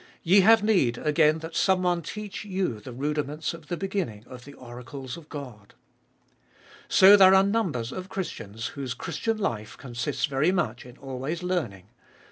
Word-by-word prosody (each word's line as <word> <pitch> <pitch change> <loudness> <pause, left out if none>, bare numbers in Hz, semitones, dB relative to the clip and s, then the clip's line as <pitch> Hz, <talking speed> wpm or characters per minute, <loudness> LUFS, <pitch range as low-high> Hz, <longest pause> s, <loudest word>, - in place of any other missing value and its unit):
Ye 185 +4 +5
have 220 +2 +6
need 175 - +2
again 155 0 +3
that 165 0 -8
some 190 -1 +2
one 175 -1 +1
teach 210 +5 -7
you 185 - -2
the 125 - -10
rudiments 150 +4 -3
of 165 -2 -12
the 175 - -3
beginning 185 - -4
of 125 0 -12
the 140 0 -12
oracles 125 +2 -9
of 165 -2 -13
God. 125 -9 -9 1.1
So 195 +2 +8
there 190 -1 +7
are 190 - +6
numbers 185 - -1
of 185 +1 -7
Christians 115 - -5
whose 130 -3 -5
Christian 185 - -3
life 115 - -3
consists 130 +2 -3
very 140 +4 +1
much 125 -10 -2
in 125 +2 -14
always 135 +6 -5
learning. 115 - -3
150 Hz, 165 wpm, -26 LUFS, 125-185 Hz, 1.1 s, So